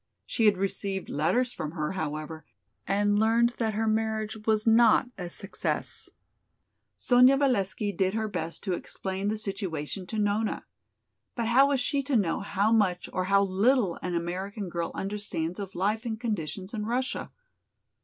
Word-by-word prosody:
She 225 - 0
had 205 -2 +5
received 195 0 -3
letters 245 - +1
from 155 0 -5
her, 155 -3 -2
however, 155 -3 -4 0.4
and 205 +1 +2
learned 230 +2 +3
that 220 -3 0
her 225 +1 0
marriage 220 0 0
was 215 -1 +2
not 230 +2 +5
a 180 -2 -6
success. 195 +3 -2 0.9
Sonya 250 +2 +5
Valesky 210 -6 +1
did 190 +1 +1
her 220 -1 0
best 165 -5 -5
to 190 - -1
explain 190 +2 -4
the 215 +1 0
situation 195 -4 -4
to 220 - -4
Nona. 210 +1 0 0.7
But 230 -2 -1
how 265 +4 +6
was 280 -2 +1
she 280 +3 +1
to 275 0 -1
know 195 -7 +2
how 205 +1 0
much 195 -6 +2
or 185 - 0
how 200 +1 +4
little 200 +1 +2
an 180 -1 -2
American 185 +4 -3
girl 170 -1 -2
understands 195 -3 -3
of 195 -1 -6
life 210 +5 0
and 225 -3 -4
conditions 200 -3 -3
in 210 -1 -3
Russia? 255 +2 -2
205 Hz, 160 wpm, -28 LUFS, 185-225 Hz, 0.9 s, how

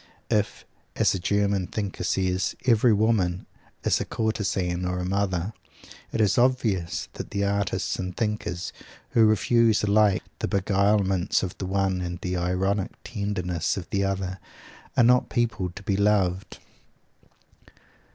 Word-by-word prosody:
If, 105 -1 0 0.3
as - - +3
a 95 - -2
German 100 0 +1
thinker 100 -4 -4
says, 95 0 0
every 120 -1 +5
woman 100 -4 +1 0.4
is - - +2
a - - -2
courtezan 95 -5 -1
or 90 0 -1
a 90 - -2
mother, 95 0 -1 0.6
it - - -2
is 105 -2 +3
obvious 115 -9 +1
that - - -7
the 100 0 -1
artists 100 -1 -1
and 90 -1 -4
thinkers 105 -5 -2 0.4
who 115 -2 +5
refuse 110 +1 +3
alike 105 -1 +3 0.2
the - - -1
beguilements 100 -1 +2
of 95 - -4
the 95 - -3
one 95 -1 0
and 90 -1 -4
the 90 0 -2
ironic 95 +3 0
tenderness 95 -7 -2
of 90 - -5
the 100 0 +1
other, 95 -1 -2 0.6
are - - +6
not 125 +2 +4
people 115 -7 0
to 95 +3 -11
be 100 - 0
"loved." 100 -2 +1
100 Hz, 140 wpm, -25 LUFS, 90-105 Hz, 0.6 s, are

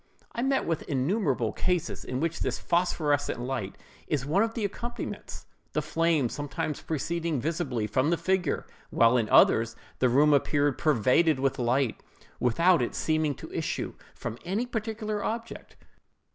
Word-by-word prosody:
I 235 - -3
meet 270 +1 +1
with 165 -2 -1
innumerable 135 - 0
cases 180 -2 -1
in 125 - -3
which 165 +2 -1
this - - -1
phosphorescent 155 -6 0
light 125 -6 -4 0.3
is 140 -4 -1
one 165 +8 +2
of 225 0 0
the 225 -4 -1
accompaniments, 235 +4 -6 0.3
the - - +1
flame 165 -5 +2
sometimes 145 +3 -4
proceeding 165 0 -2
visibly 140 -6 -1
from 130 +7 +1
the 170 - +2
figure; 185 +2 0 0.2
while 115 +1 +4
in 115 -3 +1
others, 115 0 +5 0.2
the 130 - +4
room 145 +4 +5
appeared 145 0 +2
pervaded 150 +2 +3
with 135 -1 0
light, 125 0 +1 0.4
without 165 +8 +4
its 120 - -2
seeming 155 -2 +1
to - - -10
issue - - -2 0.2
from 115 - -6
any 200 +7 -1
particular 220 -3 -3
object. 230 +1 -5
150 Hz, 150 wpm, -28 LUFS, 130-180 Hz, 0.4 s, others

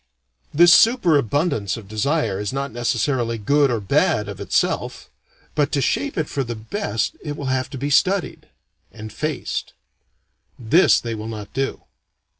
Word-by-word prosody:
This 175 +3 +6
super 225 -9 +5
abundance 140 - 0
of 110 -4 -11
desire 110 -1 -1
is 105 -1 -3
not 140 +1 -3
necessarily 120 0 -1
good 140 +6 +2
or 120 -2 0
bad, 100 - +1
of - - -7
itself. - - -1 0.4
But 145 -2 0
to 145 - +2
shape 275 - -1
it 155 -2 -1
for 140 - -2
the 120 -1 -5
best 110 - -3
it 145 -1 -5
will 140 - -6
have 130 0 -2
to 135 - -7
be 140 +3 -3
studied 185 +5 +1 0.4
and 110 -1 -10
faced. 155 +4 -4 0.8
This 125 +10 +4
they 115 -1 -5
will 110 0 -6
not 105 -2 -8
do. 135 +1 -3
135 Hz, 160 wpm, -21 LUFS, 110-150 Hz, 0.8 s, This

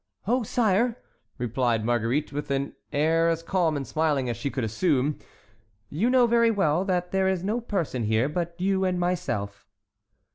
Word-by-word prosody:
"Oh, 245 +5 +2
sire," 225 +1 +1 0.4
replied 120 -2 0
Marguerite, 120 +6 0
with 145 +1 -4
an 140 0 -1 0.2
air 160 +3 +2
as 165 0 -1
calm 165 -4 +1
and 135 - -4
smiling 150 -5 0
as - - -4
she 140 - -3
could 130 -2 -3
assume, 140 - 0 0.7
"you 195 +12 +1
know 255 -1 +5
very 235 0 +4
well 185 -6 +2
that 180 -2 -1
there 190 0 +2
is 190 -2 0
no 220 +5 -1
person 170 - -2
here 110 +4 +2
but 170 +2 -3
you 190 +1 +1
and 185 -1 0
myself." 175 - -2
165 Hz, 170 wpm, -26 LUFS, 135-190 Hz, 0.7 s, know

